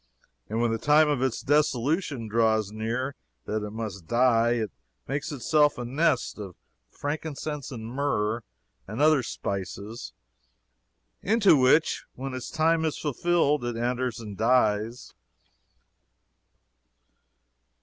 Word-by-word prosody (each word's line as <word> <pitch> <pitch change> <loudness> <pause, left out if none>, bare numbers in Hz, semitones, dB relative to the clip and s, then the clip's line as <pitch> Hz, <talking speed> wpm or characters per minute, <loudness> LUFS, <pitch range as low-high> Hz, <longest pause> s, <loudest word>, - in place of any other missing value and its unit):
And 110 +2 -2
when 120 -1 +2
the 115 - -1
time 150 +3 +5
of 145 -4 0
its 130 -4 0
dissolution 145 - +1
draws 110 -2 +2
near, 115 +5 -2 0.3
that 110 0 -2
it 105 - -4
must 105 -5 -6
die, 120 0 +3
it 110 -3 -2 0.4
makes 140 +3 -3
itself 145 +2 +2
a 120 - -4
nest 135 -1 0
of 95 -4 -7 0.3
frankincense, 150 - -4
and 115 -4 -7
myrrh, 120 -3 -1 0.5
and 105 +4 -6
other 155 -1 +5
spices, 100 - -5 1.1
into 205 -4 +4
which, 135 +4 +3
when 135 +1 -5
its 130 -1 -5
time 160 +1 +2
is 160 -2 -1
fulfilled, 150 0 +1
it 120 -1 -3
enters 125 0 -1
and 105 -3 -7
dies. 115 -1 +1
125 Hz, 120 wpm, -27 LUFS, 110-145 Hz, 1.1 s, time